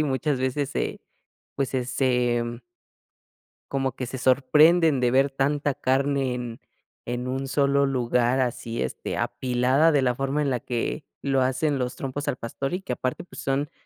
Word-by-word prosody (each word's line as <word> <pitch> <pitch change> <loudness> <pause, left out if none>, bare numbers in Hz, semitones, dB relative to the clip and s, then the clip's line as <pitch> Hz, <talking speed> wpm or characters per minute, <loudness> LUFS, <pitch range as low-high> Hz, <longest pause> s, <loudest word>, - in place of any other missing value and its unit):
y - - +4
muchas 140 -1 0
veces 130 +2 0
se, - - -3 0.6
pues, 135 -2 0
se 130 -2 -1
se, 125 -2 +1
mm 120 0 -5 1.1
como 135 -1 0
que 130 - -3
se 130 +2 -6
sorprenden 150 +4 +4
de 125 -1 +3
ver 135 +2 +3
tanta 140 +1 0
carne 135 0 +1
en 120 -2 -6 0.5
en 120 +1 -2
un 135 +1 -2
solo 140 0 +2
lugar 125 -1 +1
así, 120 -2 -2
este, - - -4
apilada 130 +5 +2
de 145 -2 +3
la 125 -2 +1
forma 135 +3 0
en 140 - 0
la 125 - 0
que 125 +5 -3 0.2
lo 135 -1 +1
hacen 130 +3 +1
los 125 -1 -2
trompos 140 +2 -5
al 145 - 0
pastor, 135 +5 -4
y 180 - -2
que 130 -9 -3
aparte, 130 +1 -3
pues, 175 - -11
son 135 +2 -1
130 Hz, 180 wpm, -25 LUFS, 125-140 Hz, 1.1 s, y